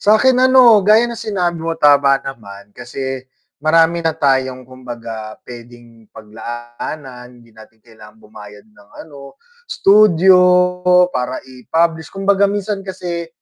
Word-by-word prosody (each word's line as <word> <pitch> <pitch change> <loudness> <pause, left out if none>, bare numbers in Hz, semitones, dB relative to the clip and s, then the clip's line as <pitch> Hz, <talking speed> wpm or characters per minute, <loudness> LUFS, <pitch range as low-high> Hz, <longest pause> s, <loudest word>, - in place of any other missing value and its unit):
Sa'kin 220 +5 +3
ano, 255 -4 +5
gaya 215 +4 +3
ng 240 - -4
sinabi 190 -7 -3
mo 165 0 -4
tama 145 -2 +3
naman, 105 -6 -11
kasi 130 +2 -7 0.4
marami 165 +2 +2
na 160 -1 -2
tayong 130 -3 -1
kumbaga 115 -4 -9
puwedeng 120 -2 -15
paglaanan, 120 +4 -10
hindi 115 -1 -21
natin 110 0 -19
kailangan 110 -2 -17
bumayad 105 -1 -15
ng 105 -2 -23 0.2
ano 140 - -14 0.3
studio, 190 -3 +4 0.7
para 125 0 -3
i-publish 160 +6 -2
kumbaga 195 0 0
minsan 205 0 -4
kasi 180 -3 -6
135 Hz, 120 wpm, -16 LUFS, 120-180 Hz, 0.7 s, ano